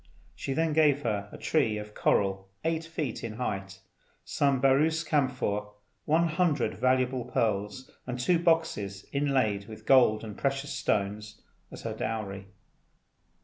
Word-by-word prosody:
She 135 - -4
then 160 +1 +1
gave 145 -2 +3
her 100 -3 -2
a - - -9
tree 110 -9 +1
of 105 0 -7
coral 95 -2 +1 0.2
eight 165 0 0
feet 155 -7 -4
in 115 -2 -4
height, 95 -5 -4 0.4
some 140 -2 +1
Baroos 150 +5 +3
camphor, 130 -9 0 0.4
one 165 +3 +3
hundred 160 -2 +1
valuable 130 -1 +1
pearls, 115 +1 -1 0.2
and 125 0 -4
two 170 +7 +3
boxes 160 - 0
inlaid 130 -8 +1
with 110 -1 -11
gold 120 -5 +5
and 105 -2 -7
precious 140 +1 -2
stones, 105 +1 -2 0.3
as - - -10
her - - -3
dowry. 100 -3 -4
125 Hz, 140 wpm, -29 LUFS, 105-145 Hz, 0.4 s, gold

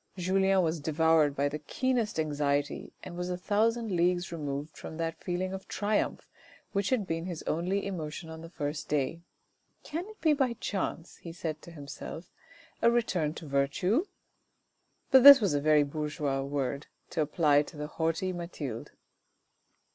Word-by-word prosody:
Julien 190 +1 +3
was 165 0 0
devoured 155 -1 +3
by 140 +1 +1
the 150 +1 -4
keenest 230 - -1
anxiety 145 -1 -1
and 175 - -8
was 180 +1 -3
a 180 - -2
thousand 220 +4 +1
leagues 175 0 +1
removed 145 -2 -4
from 160 - -8
that 165 -1 -3
feeling 185 +1 -2
of 190 0 -7
triumph 205 0 -1 0.4
which 200 -1 0
had 245 -6 +1
been 165 0 -3
his 175 -4 -5
only 180 +5 -1
emotion 165 -4 -5
on 160 0 -8
the 165 - -9
first 150 -2 -4
day. 150 +3 0 0.6
"Can 335 +5 -4
it 430 0 -13
be 315 -2 +4
by 265 -4 +1
chance," 190 -6 -4
he 170 - -9
said 160 -2 -5
to - - -12
himself, 150 +2 -8 0.5
"a 230 - +6
return 185 -10 0
to - - -8
virtue?" 145 - +1 1.1
But 265 -1 +8
this 280 0 +12
was 200 -8 +1
a 145 - +1
very 150 0 +5
bourgeois 145 -2 -2
word 140 +1 -2 0.2
to 165 - 0
apply 150 -1 +3
to 150 - -9
the 150 - -3
haughty 165 +4 -1
Mathilde. 155 -9 -5
165 Hz, 160 wpm, -30 LUFS, 150-190 Hz, 1.1 s, this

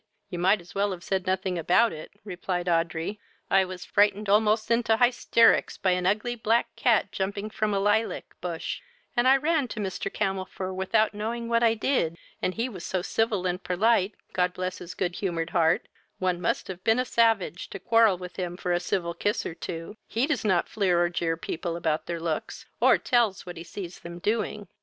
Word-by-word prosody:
You 175 - -4
might 190 +4 +4
as 175 +1 -15
well 200 +1 +1
have 175 -1 -9
said 190 -1 -2
nothing 185 -1 0
about 200 +8 +3
it, 155 - -8
(replied 180 -2 -3
Audrey.) 170 +3 0 0.3
I 195 0 +5
was 185 -1 -8
frightened 205 0 +2
almost 215 +2 +3
into 230 -1 +3
highsterricks 240 -1 +4
by 190 - +2
an 180 0 +1
ugly 215 +5 +1
black 230 0 0
cat 235 -4 +2
jumping 200 +2 -3
from 215 0 0
a 200 - +1
lylac 205 +3 0
bush, 170 -2 -4 0.3
and 240 +1 +3
I 265 +1 +7
ran 300 -1 +1
to 230 - -6
Mr. 195 0 -3
Camelfor 190 -2 -3
without 215 +4 +1
knowing 230 +3 -3
what 230 0 +3
I 230 -1 +4
did, 215 - 0 0.2
and 185 - -1
he 230 +3 -1
was 190 -9 -8
so 185 -2 -2
civil 215 -3 0
and 180 +1 -2
perlite, 195 +2 +2 0.2
God 180 -1 +1
bless 185 0 -3
his 175 -1 -8
good 175 -2 -2
humoured 170 -4 -2
heart, 165 -1 +2 0.3
one 180 -1 -1
must - - -1
have 185 -1 -7
been 225 +1 +3
a 255 - +1
savage 225 -7 +1
to - - -6
quarrel 225 0 +4
with 180 0 -9
him 180 -2 -3
for 180 -1 -1
a 175 - +2
civil 170 -1 -1
kiss 205 +5 -1
or - - -4
two: 165 +4 -7
he 235 +4 +1
does 295 -5 -1
not 185 -5 +2
fleer 185 -5 +1
or 175 0 +3
jeer 165 -1 -1
people 165 +1 -4
about 160 -2 -1
their 170 -1 -3
looks, 165 -2 -4
or - - +6
tells 235 -6 +1
what 175 -1 -7
he 165 - -7
sees 175 +1 -8
them 170 0 -8
doing." 210 +1 -2
190 Hz, 205 wpm, -27 LUFS, 175-220 Hz, 0.3 s, I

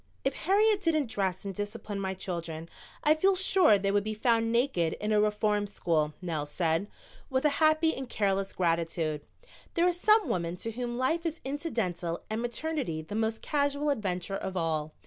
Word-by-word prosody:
"If 270 - +2
Harriet 405 +6 +3
didn't 310 - +1
dress 190 -4 -1
and 195 - -3
discipline 205 +1 -5
my 190 -1 -2
children 170 -3 -5 0.3
I 300 - +6
feel 380 +5 +3
sure 370 - +5
they 195 0 0
would 205 0 +2
be 215 0 -3
found 225 0 +2
naked 235 -9 +1
in 210 +1 -3
a 210 -1 +4
reform 210 0 +1
school," 155 -6 0
Nell 155 -4 -2
said, 165 +4 0 0.4
with 260 +1 0
a - - +6
happy 310 +1 +4
and 265 -2 -6
careless 195 -2 0
gratitude. 165 -3 0 0.5
There 345 +1 +4
are 360 - +3
some 425 +4 +4
women 170 -1 -1
to 225 +5 -5
whom 240 +1 -4
life 320 +7 +1
is 330 -1 -3
incidental 225 - -2
and 220 +1 -1
maternity 240 - -2
the 160 - -9
most 220 +1 -1
casual 285 0 +1
adventure 195 -5 -2
of 190 -1 -4
all. 155 -2 -1
210 Hz, 180 wpm, -29 LUFS, 180-285 Hz, 0.5 s, I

